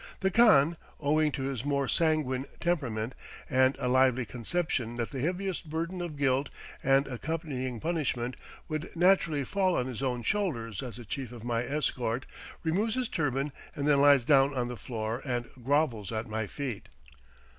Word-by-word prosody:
The 190 0 +2
khan, 170 -8 +6 0.2
owing 150 +1 +2
to 135 - -3
his 135 -3 -2
more 140 -1 0
sanguine 150 -5 +1
temperament, 130 -9 -1 0.3
and 130 +1 +3
a - - -2
lively 130 -1 +3
conception 120 0 -1
that 120 -1 -3
the 135 - -4
heaviest 180 +2 -2
burden 165 +3 -3
of 165 -4 -5
guilt 135 0 +2 0.3
and 135 +1 +4
accompanying 135 -2 -3
punishment 130 -7 -1 0.3
would 155 +3 -4
naturally 170 -5 +3
fall 185 +4 +1
on 125 - +1
his 125 -3 -5
own 125 -3 -1
shoulders 120 - -1
as 125 -5 -6
the 120 - -8
chief 125 +3 -4
of 120 -3 -9
my 115 -1 0
escort, 125 -3 -1 0.4
removes 200 +8 +1
his 255 -2 -1
turban 145 -2 0 0.2
and 145 -2 -1
then 145 -2 +5
lies 140 -4 +6
down 140 0 +5
on 120 -1 -1
the 125 - -4
floor 115 0 -4
and 120 -3 -2 0.2
grovels 130 - +1
at 110 0 -3
my 110 -1 -2
feet. 130 -6 -5
135 Hz, 165 wpm, -30 LUFS, 125-160 Hz, 0.4 s, khan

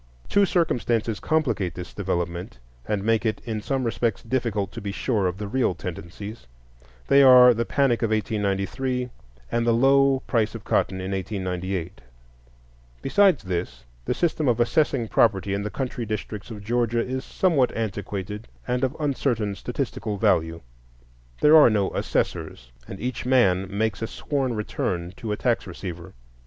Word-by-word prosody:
Two 200 -1 +4
circumstances 120 - 0
complicate 115 - 0
this 90 -1 -8
development 85 -4 -3 0.3
and 105 -2 -1
make 115 0 +2
it 110 -2 -1
in 110 -3 -3
some 135 +3 -1
respects 115 -2 -1
difficult 115 -7 -1
to - - -7
be 100 -1 -4
sure 105 -2 0
of 90 0 -3
the 105 0 -5
real 120 -4 +1
tendencies; 90 - -8 0.6
they 140 - +6
are 125 -2 +9
the 115 +1 -1
panic 135 -3 +1
of 115 - +1
1893, 110 +4 -1 0.4
and 120 - +1
the - - +5
low 135 +2 +4
price 110 -3 0
of 110 - -7
cotton 95 - 0
in 95 +1 -4
1898. 95 -2 -3 1.0
Besides 190 - +4
this, 90 -7 -4 0.2
the - - -1
system 160 -3 0
of 120 -2 +2
assessing 120 -1 +2
property 100 -3 +2
in 100 - -1
the 105 - -3
country 125 -1 -4
districts 105 0 -5
of 105 -3 -8
Georgia 120 +1 0
is 130 +1 -3
somewhat 155 -9 +2
antiquated 105 -1 -4 0.2
and 125 +1 0
of 130 +3 -1
uncertain 125 -8 0
statistical 120 -2 -4
value; 80 -3 +1 0.8
there 150 +1 +7
are 155 -5 +8
no 105 -3 +1
assessors, - - -2 0.2
and 95 - -8
each 125 +2 -3
man 95 -8 +3
makes 105 +1 -1
a 115 - -1
sworn 135 -3 -2
return 90 -4 -3
to 110 - -5
a 105 - -1
tax 120 -4 0
receiver. 85 -3 -8
110 Hz, 155 wpm, -24 LUFS, 95-125 Hz, 1.0 s, are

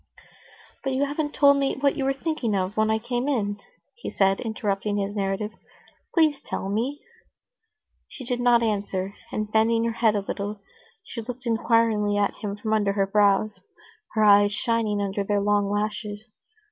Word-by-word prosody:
"But 270 -1 -1
you 270 +2 +1
haven't 295 +1 -3
told 280 -1 +6
me 275 -1 0
what 280 0 +2
you 275 -3 -2
were 270 - +2
thinking 270 -6 -2
of 190 +1 -1
when 215 0 +2
I 220 - +2
came 245 +3 -2
in," 205 -6 -1 0.3
he 475 - -7
said, 195 -1 +2
interrupting 210 -3 -2
his 200 +1 -2
narrative; 200 +1 -2 0.6
"please 310 -4 +3
tell 195 - -4
me!" 245 +8 -2 1.1
She 260 - -10
did 245 0 -2
not 240 -1 +4
answer, 200 -3 -2 0.2
and, 215 0 -3
bending 225 +1 +3
her 230 - 0
head 225 -2 +2
a 205 - +1
little, 205 +1 -4 0.4
she 230 - -7
looked 250 +2 -8
inquiringly 225 -3 +2
at 205 -1 +1
him 205 -2 -3
from 215 +1 -2
under 205 -2 +2
her 200 -1 +1
brows, 205 +1 +2 0.5
her 215 - +2
eyes 205 0 +6
shining 215 -1 0
under 200 0 -2
their 205 +1 0
long 205 0 +1
lashes. 210 +1 -3
215 Hz, 170 wpm, -25 LUFS, 205-240 Hz, 1.1 s, told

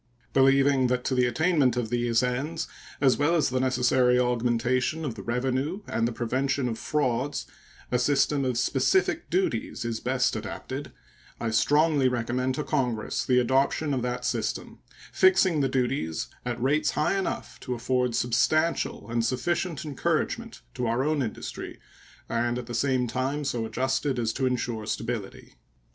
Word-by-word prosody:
Believing 135 0 +4
that 125 0 0
to - - -1
the 125 -1 +3
attainment 140 -1 +2
of 115 -3 -2
these 120 0 +2
ends, 145 +7 -2 0.3
as 135 -3 +4
well 150 +4 +3
as 155 - +2
the 130 0 0
necessary 125 -1 +3
augmentation 125 +4 0
of 130 - -2
the 105 - -8
revenue 130 - -1
and 115 0 0
the - - -2
prevention 130 +3 -1
of 115 -2 -3
frauds, 140 -2 -1 0.5
a 125 - +2
system 140 +2 +2
of 125 -2 0
specific 385 - +1
duties 370 - -1
is 115 -1 -2
best 130 0 +1
adapted, - - -6 0.5
I 115 - -2
strongly 145 +3 +3
recommend 125 +1 -1
to 150 - -2
Congress 125 -8 -1
the 125 - +2
adoption 135 +4 +2
of 130 - 0
that 125 0 -3
system, 120 -3 -2 0.3
fixing 185 -4 +4
the 135 - +1
duties 125 - -1 0.2
at 120 -1 -2
rates 145 +4 +2
high 150 +5 +2
enough 195 -1 -3
to 125 - -4
afford 125 0 0
substantial 155 +7 +1
and 115 0 0
sufficient 150 +6 -1
encouragement 140 - -2
to 125 - -2
our 120 +3 +1
own 150 0 +1
industry 115 -4 -5 0.5
and 120 +1 0
at 125 - -5
the 120 - -7
same 130 +1 +1
time 130 +5 -2
so 120 -4 -1
adjusted 130 +3 -1
as 115 -2 0
to 130 -2 0
insure 120 -3 -2
stability. 115 -4 -5
130 Hz, 155 wpm, -27 LUFS, 120-140 Hz, 0.5 s, Believing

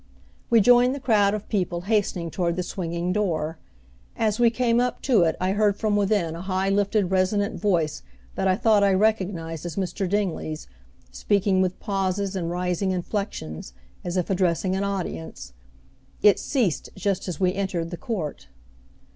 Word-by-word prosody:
We 230 -2 +6
joined 245 +3 +5
the - - -5
crowd 210 -5 +3
of 210 - -7
people 180 -4 -1
hastening 185 -4 0
toward 170 -1 -1
the 180 - -2
swinging 175 0 -3
door. 165 -6 -1 0.6
As 215 -1 0
we 240 -1 +6
came 235 0 +1
up 250 0 0
to 245 -8 +4
it 160 - +1
I 185 +1 0
heard 205 0 +2
from 215 -1 0
within 200 -5 +1
a 170 - -6
high 190 +1 -1
lifted 200 -1 +1
resonant 200 +3 +1
voice 170 -7 +1 0.3
that 190 - -1
I 185 - +3
thought 210 0 +3
I 195 -1 +4
recognized 185 -6 0
as 175 -2 -5
Mr. 190 0 -2
Dingley's 180 -6 -2 0.5
speaking 200 -2 +1
with 185 -1 -1
pauses 195 -1 -1
and 170 -3 -2
rising 180 +2 -1
inflections, 180 - -4 0.3
as 175 +1 -3
if 180 +1 -1
addressing 185 0 +1
an 195 - -1
audience. 165 - -5 0.7
It 205 -2 +6
ceased 235 - -1
just 195 0 -1
as 175 -5 -4
we 185 -1 +2
entered 185 -4 -2
the - - -3
court. 165 - -4
190 Hz, 165 wpm, -24 LUFS, 175-205 Hz, 0.7 s, We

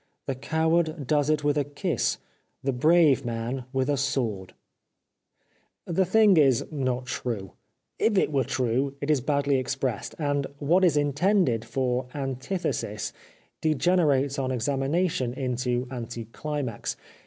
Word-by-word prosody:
The 135 - -1
coward 160 +2 0
does 145 +2 +2
it 155 -1 +1
with 145 0 +2
a - - +2
kiss. 145 +1 -1 0.5
The 135 0 0
brave 150 +1 +4
man 120 +2 -3
with 130 -1 0
a 145 -1 +1
sword! 120 -9 -2 0.7
" - - -44
The 180 +2 +1
thing 205 0 +5
is 135 -6 +4
not 130 -4 -1
true; 110 -6 -4 0.5
if 215 -3 +2
it 185 - +2
were 135 -2 +2
true 130 +3 0
it 145 +2 0
is 145 -4 +2
badly 140 0 +1
expressed, 130 -3 -3
and 145 -2 0
what 165 +7 +2
is 165 -5 +4
intended 145 - +2
for 125 -1 -1
an 135 -3 -2
tithesis 130 - -3 0.5
degenerates 150 -3 +2
on 130 -1 -1
examination 135 +2 0
into 125 -1 -1
anti 120 -2 -5
chmax. 135 0 -4
140 Hz, 140 wpm, -26 LUFS, 125-155 Hz, 0.7 s, thing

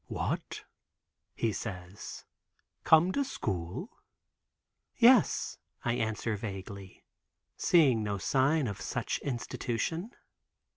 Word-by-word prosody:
"What," - - -3 0.7
he 115 -2 0
says, 95 -2 -7 0.6
"come 160 +3 +6
to 280 - +1
school?" 95 - -4 1.0
"Yes," 240 -2 +5 0.3
I 120 - +2
answer 110 -1 -1
vaguely, 95 -2 -7 0.5
seeing 140 -10 +4
no 105 -1 -1
sign 135 +8 +2
of 100 -4 -4
such - - -2
institution. 140 - -3
115 Hz, 90 wpm, -31 LUFS, 100-160 Hz, 1.0 s, come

